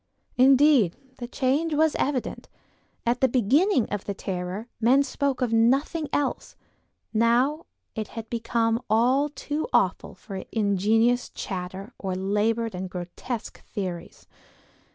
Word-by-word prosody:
Indeed, 265 - +5 0.2
the 240 - -5
change 285 +5 0
was 315 0 +3
evident; 270 -3 -2 0.6
at 240 +2 +1
the 265 - +5
beginning 260 - +3
of 205 - -3
the 200 - -3
terror 185 +4 -4
men 255 +5 +4
spoke 275 -1 -2
of 235 -2 -1
nothing 275 +7 +2
else; 285 -2 -2 0.6
now 245 +8 +2 0.3
it 215 -1 -4
had 225 -1 -8
become 230 0 0
all 255 +7 +3
too 295 +3 -4
awful - - +1
for 195 -3 -8
ingenious 220 +3 +2
chatter 190 +3 -6
or 190 -2 -3
labored 210 +4 0
and 185 0 -5
grotesque 180 +7 -6
theories. 180 -4 -6
230 Hz, 125 wpm, -25 LUFS, 205-270 Hz, 0.6 s, Indeed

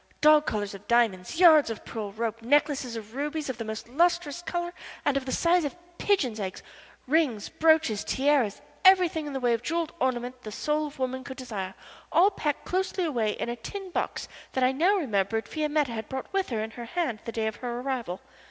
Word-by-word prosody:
Dog 305 0 +6
collars 205 -2 -2
of 195 +1 -11
diamonds, 235 - +2
yards 315 -7 +7
of 225 - -6
pearl 215 -3 -5
rope, 225 +2 -3
necklaces 275 -1 +2
of 220 -1 -8
rubies 295 +1 -2
of 240 - -11
the - - -2
most 220 0 -6
lustrous 340 +3 +1
color 350 0 -3 0.3
and 285 - +2
of 270 -1 -1
the - - -2
size 345 +3 +3
of 290 +3 -3 0.2
pigeons' 260 - +1
eggs, 190 -2 -5 0.4
rings, 270 -7 +1
brooches, 315 -9 +3
tiaras 270 -6 +1 0.2
everything 360 -5 +5
in 290 - -5
the 270 - -2
way 245 -2 +2
of 230 - -1
jewelled 330 +4 -2
ornament 250 -1 -1
the 215 - -7
soul 300 +6 -1
of 290 - -12
woman 260 0 -2
could 260 0 -8
desire 200 -8 -5 0.4
all 380 +4 +5
packed 300 -7 -2
closely 375 0 -1
away 235 -10 0
in - - -4
a 240 - -2
tin 380 - -7
box - - -2 0.3
that 260 - +1
I 255 - +5
now 340 +10 +3
remembered 225 - 0
Fiametta 300 -3 0
had 220 -2 -5
brought 265 +6 -5
with 390 -1 0
her 220 -3 -1
in 220 - -5
her 235 +1 -8
hand 250 -4 -2
the 230 - -4
day 225 -1 -1
of 220 -1 -2
her 240 -1 -4
arrival. 250 -9 -3
260 Hz, 205 wpm, -27 LUFS, 225-315 Hz, 0.4 s, yards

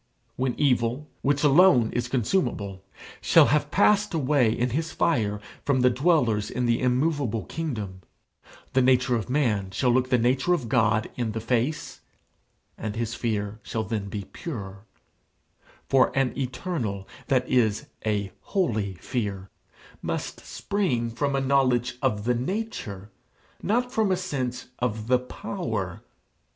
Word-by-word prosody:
When 130 -1 -2
evil, 125 +1 +1
which 145 +1 +1
alone 145 -6 +6
is 120 0 -1
consumable, 120 - -1 0.4
shall - - +6
have 150 -1 +1
passed 205 0 +3
away 135 -6 +3
in 120 +2 0
his 155 +5 -1
fire 105 -10 +1 0.2
from 135 -3 +2
the 125 0 +5
dwellers 125 -6 +2
in 125 0 -1
the 120 -1 +2
immovable 125 - 0
kingdom, 110 -13 -4 0.7
the 130 - +4
nature 125 -1 +3
of 110 -2 -3
man 115 -9 +1
shall 125 +6 +1
look 130 +1 +2
the 125 - +4
nature 130 +9 +2
of 125 -9 -5
God 110 -2 +2
in 115 -3 -1
the 110 - -2
face, 125 +6 -1 0.8
and 110 -1 -4
his 115 0 -2
fear 110 -3 -2
shall 110 +1 -3
then 105 -3 -3
be 100 0 -4
pure; 100 - -7 1.0
for 135 -1 +4
an 135 -2 +1
eternal, 125 - -3 0.2
that 130 -2 +2
is 110 -5 +2 0.2
a 105 -2 -1
holy 110 - -1
fear, 100 -2 -4 0.5
must - - -4
spring 130 - -1
from 140 +4 -1
a 135 - +1
knowledge 130 -2 +2
of 105 -6 0
the 125 +2 +2
nature, 120 - -4 0.5
not 245 +4 0
from 220 -5 +1
a 185 - +2
sense 130 -9 -3
of 110 -3 -2
the 125 +1 +3
power. 125 - -4
125 Hz, 140 wpm, -26 LUFS, 110-140 Hz, 1.0 s, alone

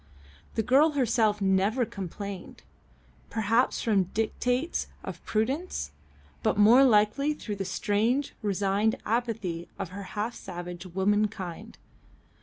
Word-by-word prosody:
The 220 - +1
girl 280 +7 +4
herself 225 -6 +2
never 195 +6 +2
complained 200 -1 -7 0.7
perhaps 225 +3 +1
from 205 -5 +3
dictates 245 - -1 0.2
of - - -7
prudence, 225 - -1 0.5
but 220 - +1
more 225 +6 +7
likely 255 +5 +3
through 210 -8 -5
the 195 - -3
strange, 220 +8 0
resigned 205 +1 +1
apathy 215 -7 -2
of 195 -3 -4
half 200 +4 -4
savage 175 -2 -7
womankind. 190 -1 -1
210 Hz, 105 wpm, -28 LUFS, 195-235 Hz, 0.7 s, more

